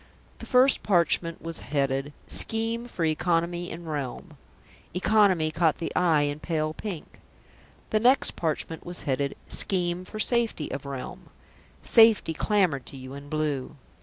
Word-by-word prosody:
The - - -9
first 255 +1 +5
parchment 170 -3 +1
was 165 -1 -4
headed: 135 0 -1 0.2
SCHEME 225 +1 -1
FOR 170 -8 -2
ECONOMY 170 +2 0
IN 170 +1 -8
REALM 145 -5 -5 0.6
"Economy" 185 -5 +3
caught 160 -1 +2
the 165 - -5
eye 165 -5 +3
in 145 +1 -2
pale 155 -2 -1
pink. 185 -3 -7 0.7
The 215 - +3
next 250 +5 +4
parchment 160 0 -2
was 175 0 -7
headed: 140 0 -1
SCHEME 180 -1 -1
FOR 215 - -8
SAFETY 230 - +1
OF 140 +1 -5
REALM 135 -2 -7 0.5
"Safety" 225 -7 +5
clamoured 180 - +1
to 135 - -10
you 130 0 -9
in 140 +1 -9
blue. 150 -4 -2
165 Hz, 140 wpm, -26 LUFS, 145-195 Hz, 0.7 s, first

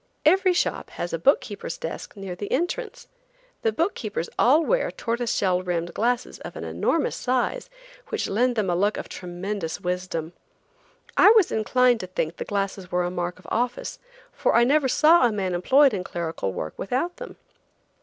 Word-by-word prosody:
Every 370 +4 +5
shop 355 - -1
has 175 - -5
a 165 - -1
book 275 - +4
keeper's 205 -6 -6
desk 165 - -6
near 195 -2 -5
the 205 +3 -6
entrance. 445 - -2 0.5
The 225 - +2
book 330 - 0
keepers 205 -6 -4
all 295 +7 +5
wear - - +1
tortoise 235 0 -2
shell 185 -2 +1
rimmed 175 -2 -2
glasses 245 +2 -1
of - - -9
an - - -6
enormous 330 - 0
size, 260 - -1 0.4
which 445 - -2
lend 245 +4 +1
them 215 -4 0
a - - +1
look 205 +4 +1
of - - -5
tremendous 180 -1 -5
wisdom. 180 -2 -3 0.8
I - - +8
was 425 -6 +5
inclined 245 +3 +3
to 185 - -5
think 170 -2 -3
the - - -4
glasses 195 -2 -3
were 180 0 +1
a 175 - -2
mark 175 0 -3
of 185 - -19
office, 245 +1 -2 0.3
for - - +1
I 235 - +6
never 280 +2 +3
saw 305 +1 +5
a - - -1
man 190 -3 -2
employed 265 +10 +4
in 190 -3 -2
clerical 165 - -3
work 80 -4 -5
without 265 - -2
them. - - -9
215 Hz, 185 wpm, -25 LUFS, 180-270 Hz, 0.8 s, I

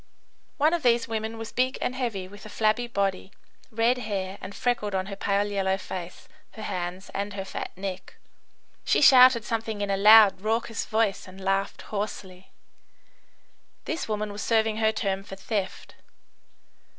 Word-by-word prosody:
One 305 +3 +3
of 345 - 0
these 240 -3 +3
women 225 0 -3
was 225 -1 -7
big 255 +1 0
and - - -1
heavy, 230 -8 -3
with 205 +2 -13
a 215 - -10
flabby 215 +3 +1
body, 195 -4 -2 0.4
red 230 +3 +1
hair, 200 -4 -4
and 195 +1 -8
freckled 210 -5 -1
on 185 0 -1
her 200 0 -6
pale 200 +1 0
yellow 195 -2 0
face, 185 -2 -8 0.3
her 220 - -8
hands, 185 -1 -5
and 200 +1 -3
her 195 -1 -5
fat - - -5
neck. 190 -1 -6 0.7
She - - +2
shouted 255 -5 +7
something 225 -2 -3
in 205 -1 -1
a 195 - +1
loud, 210 -1 +7
raucous 225 +1 -2
voice, 220 -3 0
and 185 +1 -12
laughed 195 +1 -1
hoarsely. 190 -3 -5 1.4
This 320 - -3
woman 210 -1 -2
was 205 +1 -6
serving 220 -1 +1
her 220 -1 +3
term 195 -3 -2
for 195 - -9
theft. 195 0 -4
205 Hz, 160 wpm, -26 LUFS, 195-225 Hz, 1.4 s, shouted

